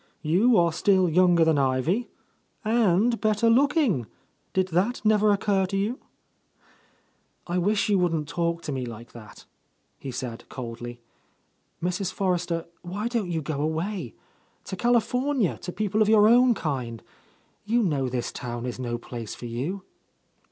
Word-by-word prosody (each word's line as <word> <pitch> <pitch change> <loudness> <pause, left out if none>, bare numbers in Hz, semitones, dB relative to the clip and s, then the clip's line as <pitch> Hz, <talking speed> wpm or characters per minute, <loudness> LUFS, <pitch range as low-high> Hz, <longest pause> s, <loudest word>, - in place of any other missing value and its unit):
You 200 +10 +4
are 170 -2 +3
still 190 +1 +3
younger 175 0 +4
than 160 -3 +3
Ivy, 140 - 0 0.3
— - - -39
and 225 0 +2
better 215 +1 +2
looking! 265 - +2 0.4
Did 190 0 0
that 190 +9 +1
never 215 -1 +4
occur 195 -1 +1
to 195 +1 -2
you?" 215 +6 -1 1.5
"I 180 +1 -1
wish 200 +3 +1
you 205 -2 +3
wouldn't 165 -4 0
talk 170 +1 -2
to 150 - -4
me 130 -2 -3
like 115 +1 -9
that," 110 -3 -13 0.5
he 135 - -7
said 125 -2 -6
coldly. 120 -1 -7 0.8
"Mrs. 180 +1 -1
Forrester, 175 -3 -1 0.2
why 200 +6 -4
don't 230 -7 -1
you 165 -3 -2
go 145 0 -3
away? 160 - -3 0.5
to - - -6
California, 245 - +1
to 180 - -6
people 210 +2 -1
of 215 - +4
your 215 -1 +6
own 245 +1 +5
kind. 125 - -4 0.6
You 230 +3 +1
know 140 -8 0
this 125 -1 -3
town 120 -2 -5
is 125 0 -5
no 120 -2 -2
place 115 -2 -7
for - - -9
you." 140 +12 -4
180 Hz, 150 wpm, -26 LUFS, 135-215 Hz, 1.5 s, your